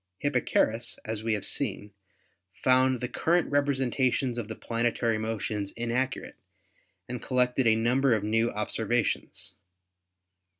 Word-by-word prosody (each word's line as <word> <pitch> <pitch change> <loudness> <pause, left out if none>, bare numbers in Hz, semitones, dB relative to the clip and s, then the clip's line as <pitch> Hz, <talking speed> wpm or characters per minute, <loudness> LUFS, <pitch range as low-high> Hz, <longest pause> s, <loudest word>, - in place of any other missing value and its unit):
Hipparchus, 120 -3 0
as 110 -1 -3
we 115 -1 +1
have 105 - -2
seen, 105 0 -2 0.7
found 130 -1 +4
the 125 - -1
current 165 +8 +1
representations 130 -3 +1
of 110 - -4
the 110 - -6
planetary 115 -1 0
motions 110 -2 -3
inaccurate 120 +3 -2 0.7
and 125 -1 -5
collected 125 -1 +1
a 110 - +5
number 125 +3 +3
of 105 - -2
new 115 +2 +2
observations. 115 +2 -2
120 Hz, 120 wpm, -28 LUFS, 110-130 Hz, 0.7 s, a